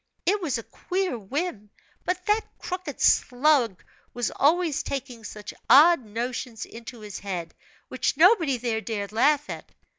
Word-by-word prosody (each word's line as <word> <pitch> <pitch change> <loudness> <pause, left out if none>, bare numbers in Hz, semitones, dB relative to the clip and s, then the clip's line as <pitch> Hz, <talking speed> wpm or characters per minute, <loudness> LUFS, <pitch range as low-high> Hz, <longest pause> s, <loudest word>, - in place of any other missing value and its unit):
It 405 +2 +2
was 300 -8 -1
a 230 - -6
queer 370 - -3
whim; 225 - -4 0.4
but 360 0 -2
that 420 +1 +3 0.2
crooked 360 -6 -6
slug 250 - +3 0.3
was 245 -2 -1
always 320 +1 +2
taking 255 -4 -5
such 210 0 -8 0.2
odd 310 0 +7
notions 230 +1 -4
into 230 0 -10
his 210 -2 -7
head, 175 -4 -5 0.3
which - - -1
nobody 330 - +5
there 230 -2 -2
dared 210 -3 -4
laugh 290 +6 +3
at. - - -8
255 Hz, 145 wpm, -26 LUFS, 225-330 Hz, 0.4 s, odd